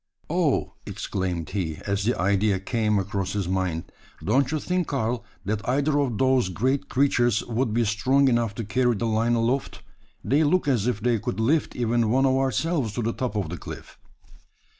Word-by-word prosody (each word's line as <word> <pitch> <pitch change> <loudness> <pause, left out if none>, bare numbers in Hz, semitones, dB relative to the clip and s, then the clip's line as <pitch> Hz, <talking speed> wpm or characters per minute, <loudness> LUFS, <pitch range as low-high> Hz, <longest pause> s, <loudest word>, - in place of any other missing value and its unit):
"Oh!" - - +1
exclaimed 90 -3 -3
he, 90 -6 -2
as 100 0 -1
the 120 - 0
idea 100 +1 +2
came 105 +1 0
across 95 -1 -2
his 100 -4 -2
mind, 90 -3 -2 0.3
"don't 130 +6 +2
you 155 - 0
think, 180 +2 -1
Karl, 120 -3 -1 0.2
that 105 +1 -1
either 145 +3 +2
of 125 -6 0
those 130 -4 +2
great 130 +10 -1
creatures 120 -5 +2
would 120 0 -1
be 115 +2 +1
strong 130 +7 +2
enough 120 -4 +1
to 115 - -4
carry 120 +3 +1
the 110 - -2
line 115 +1 +1
aloft? 120 +4 -1 0.4
They 145 +4 +2
look 155 +2 +2
as 120 -6 +2
if 120 -4 -1
they 120 -1 +2
could 100 - -4
lift 145 +8 +1
even 120 -1 +1
one 130 +4 +3
of 130 - +3
ourselves 135 - 0
to 120 - -2
the 115 +1 -1
top 125 -4 -3
of 100 -6 -1
the 85 - -5
cliff." - - -10
115 Hz, 185 wpm, -25 LUFS, 100-130 Hz, 0.4 s, one